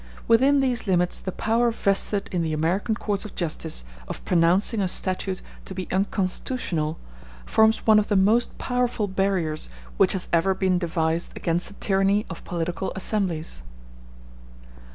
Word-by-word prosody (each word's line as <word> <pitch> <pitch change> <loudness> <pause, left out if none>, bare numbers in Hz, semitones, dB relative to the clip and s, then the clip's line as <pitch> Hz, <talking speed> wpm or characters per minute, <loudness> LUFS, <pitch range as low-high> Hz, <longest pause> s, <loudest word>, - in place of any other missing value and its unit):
Within 270 +5 +5
these 250 -4 -1
limits 180 -2 +1
the 185 - -4
power 230 +5 +1
vested 200 -2 +1
in 180 - 0
the 160 -1 -1
American 175 +8 0
courts 205 -2 -2
of 215 - -9
justice 160 - -1 0.2
of - - -7
pronouncing 180 +5 +3
a 190 - +1
statute 185 +1 0 0.2
to 190 - -8
be 185 -1 -4
unconstitutional 185 -4 -1 0.5
forms 220 - +3
one 215 -1 +6
of 210 - -1
the 205 - +1
most 215 +5 +3
powerful 245 -4 0
barriers 190 - -1 0.3
which - - +4
has 185 - -3
ever 185 +3 +3
been 185 -2 +1
devised 165 -1 -1
against 170 +1 -1
the 200 - -11
tyranny 195 +1 +1
of 165 - -8
political 175 +1 -3
assemblies. 185 - -2
190 Hz, 150 wpm, -24 LUFS, 170-215 Hz, 0.5 s, one